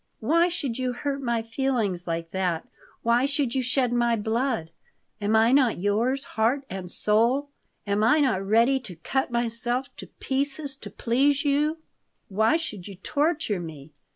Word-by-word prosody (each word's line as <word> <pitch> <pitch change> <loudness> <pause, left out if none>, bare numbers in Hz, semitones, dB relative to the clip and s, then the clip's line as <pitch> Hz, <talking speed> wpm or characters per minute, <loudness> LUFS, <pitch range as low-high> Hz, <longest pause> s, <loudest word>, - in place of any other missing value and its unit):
"Why 335 +9 +3
should 275 -8 -3
you 255 -1 -1
hurt 280 +2 -3
my 235 -3 -1
feelings 225 -7 -1
like 165 0 -3
that? 180 -4 -1 0.4
Why 235 +3 +3
should 280 -4 0
you 265 - +1
shed 250 0 +1
my 240 -1 +2
blood? 225 -5 -1 0.5
Am 210 +2 +1
I 225 +2 +5
not 265 -4 +4
yours, 225 +8 0
heart 245 +6 0
and 185 -2 -5
soul? 235 +10 +2 0.4
Am 205 +1 +1
I 245 +8 +5
not 255 -10 +2
ready 230 +7 +3
to 205 -8 -9
cut 265 +12 -1
myself 240 +2 -2
to - - -8
pieces 275 +1 -3
to - - -9
please 275 +5 +1
you? 295 +3 +2 0.5
Why 220 +9 +3
should 215 - -6
you 200 - -8
torture 290 - 0
me?" 155 -3 -9
240 Hz, 160 wpm, -26 LUFS, 210-275 Hz, 0.5 s, I